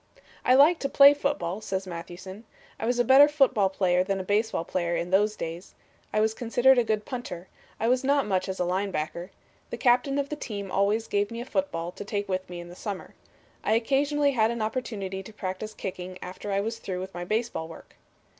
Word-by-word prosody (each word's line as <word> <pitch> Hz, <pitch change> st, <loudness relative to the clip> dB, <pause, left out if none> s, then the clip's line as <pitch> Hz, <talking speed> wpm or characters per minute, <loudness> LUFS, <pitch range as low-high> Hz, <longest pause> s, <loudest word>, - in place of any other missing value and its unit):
"I 255 Hz, -, +5 dB
liked 305 Hz, +5 st, +6 dB
to 275 Hz, -, -1 dB
play 280 Hz, +1 st, +8 dB
football," 280 Hz, -, -2 dB
says 190 Hz, -2 st, -3 dB
Mathewson. 185 Hz, +3 st, -8 dB, 0.4 s
"I 225 Hz, -, -2 dB
was 245 Hz, 0 st, +1 dB
a 245 Hz, -, +4 dB
better 270 Hz, +4 st, +8 dB
football 265 Hz, -9 st, +3 dB
player 180 Hz, -2 st, +2 dB
than 195 Hz, 0 st, -1 dB
a -, -, -3 dB
baseball 205 Hz, -2 st, 0 dB
player 175 Hz, -2 st, -1 dB
in 175 Hz, +1 st, -3 dB
those 210 Hz, +2 st, +3 dB
days. 165 Hz, +1 st, -7 dB, 0.4 s
I 215 Hz, -, +1 dB
was 220 Hz, 0 st, +2 dB
considered 245 Hz, +3 st, +3 dB
a -, -, +3 dB
good 215 Hz, -2 st, -1 dB
punter. 190 Hz, -9 st, -6 dB, 0.3 s
I 225 Hz, -, 0 dB
was 250 Hz, +2 st, +2 dB
not 280 Hz, 0 st, +2 dB
much 190 Hz, -2 st, -1 dB
as 190 Hz, -, -4 dB
a 180 Hz, -, +1 dB
line 190 Hz, +3 st, 0 dB
bucker. 170 Hz, +2 st, -4 dB, 0.4 s
The -, -, -5 dB
captain 250 Hz, +2 st, +3 dB
of 280 Hz, 0 st, -1 dB
the 300 Hz, -, -3 dB
team 200 Hz, -9 st, -6 dB
always 205 Hz, +3 st, +1 dB
gave 205 Hz, 0 st, 0 dB
me 230 Hz, -, -6 dB
a 240 Hz, -, -5 dB
football 175 Hz, -12 st, -2 dB
to -, -, -8 dB
take 205 Hz, 0 st, -3 dB
with 185 Hz, -1 st, -3 dB
me 175 Hz, -1 st, -6 dB
in 175 Hz, -, -8 dB
the 175 Hz, -, -11 dB
summer. 200 Hz, -1 st, -6 dB, 0.5 s
I -, -, +2 dB
occasionally 280 Hz, +5 st, +2 dB
had 225 Hz, -4 st, +2 dB
an 235 Hz, -1 st, -2 dB
opportunity 205 Hz, -5 st, -3 dB
to 195 Hz, -, -11 dB
practice 210 Hz, +2 st, -5 dB
kicking 185 Hz, -1 st, -6 dB
after 185 Hz, +3 st, -7 dB
I 195 Hz, 0 st, +1 dB
was 225 Hz, +2 st, -4 dB
through 185 Hz, -2 st, -4 dB
with 190 Hz, +1 st, -7 dB
my 175 Hz, -, -5 dB
baseball 215 Hz, -4 st, -2 dB
work. 165 Hz, -, -13 dB
210 Hz, 220 wpm, -27 LUFS, 185-245 Hz, 0.5 s, play